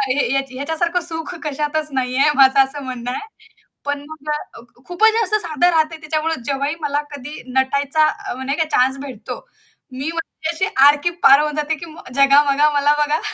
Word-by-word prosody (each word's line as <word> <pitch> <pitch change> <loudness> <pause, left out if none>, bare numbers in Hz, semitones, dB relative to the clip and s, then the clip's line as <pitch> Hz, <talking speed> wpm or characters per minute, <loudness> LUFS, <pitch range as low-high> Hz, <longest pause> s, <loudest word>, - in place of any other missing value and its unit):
हे 265 +2 +1
ह्याच्या 270 -1 -2
ह्याच्यासारखं 320 +5 -1
सुख 330 +1 -6
कशातच 300 +1 -2
नाहीये 260 +2 +2
माझं 270 0 +5
असं 280 +2 -8
म्हणणं 245 -1 -5
आहे. 425 +12 -5 0.6
पण 285 0 -2
मग 305 -1 -8
अ, 300 -4 -5 0.3
खूपच 435 +5 +3
जास्त 430 -2 0
साधं 340 +1 +2
राहतंय 320 -1 +1
त्याच्यामुळे 315 +1 -2
जेव्हाही 280 +3 -1
मला 290 0 -1
कधी 290 +1 -8
नटायचा 280 +4 +1
अ, 305 - -4
म्हणजे 265 +2 -3
काय 320 - 0
चान्स 260 +2 +2
भेटतो. 265 -3 -7 0.5
मी 270 +5 -4
म्हणजे 325 -1 -5
अशी 375 +4 0 0.2
आर 290 +1 +7
की 345 - +2
पार 275 +2 +8
होऊन 300 0 -1
जाते, 300 +1 -1
की 340 +3 -9
मग 310 - -13
जगा 275 +1 +6
बघा, 295 +2 +3
मला 290 +1 +3
बघा. 300 +2 0
295 Hz, 185 wpm, -19 LUFS, 275-320 Hz, 0.6 s, पार